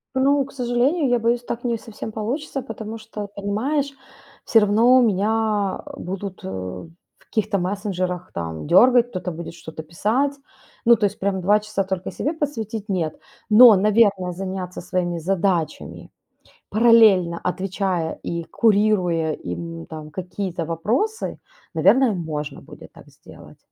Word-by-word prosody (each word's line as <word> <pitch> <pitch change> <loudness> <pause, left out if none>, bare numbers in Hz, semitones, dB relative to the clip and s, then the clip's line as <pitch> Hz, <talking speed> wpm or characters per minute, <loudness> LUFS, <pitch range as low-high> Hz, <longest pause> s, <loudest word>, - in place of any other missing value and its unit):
Ну, 275 +2 +3
к 275 - -14
сожалению, 260 +5 +1
я 245 -1 +3
боюсь, 235 +1 +1
так 240 0 -5
не 235 -2 0
совсем 220 0 -8
получится, 265 +7 -3
потому 225 -1 -7
что, 215 -2 -7
понимаешь, 225 +9 -2 0.5
всё 225 - +5
равно 225 +5 +5
меня, 210 -3 +2 0.6
а, - - -10
будут, 190 +1 -6
э, - - -5
в 95 - -9
каких-то 215 -2 -1
мессенджерах, 185 -1 -3
там, 80 -3 -5
дергать, 245 - +5
кто-то 185 -4 -4
будет 165 0 -7
что-то 160 -1 -9
писать. 220 - 0 0.5
Ну, 235 0 +7
то 210 - +1
есть 200 - -2
прям 195 -1 -1
2 205 +4 +4
часа 210 -2 -2
только 190 -1 -3
себе 295 - -2
посвятить- 225 -9 -4
нет. 170 -5 -1 0.3
Но, 225 +1 +9
наверное, 200 -2 +3
заняться 185 0 -5
своими 175 -1 -2
задачами, 180 -1 -2 0.6
параллельно 215 -6 +5
отвечая 185 -2 -2
и 170 0 -3
курируя 195 -7 +2
им, 165 - -6
там, 155 -1 -9
какие-то 180 0 -4
вопросы, 225 - -2 0.3
наверное, 210 - +4
можно 155 -6 -4
будет - - -13
так - - -16
сделать. - - -16
200 Hz, 140 wpm, -22 LUFS, 175-230 Hz, 0.6 s, Но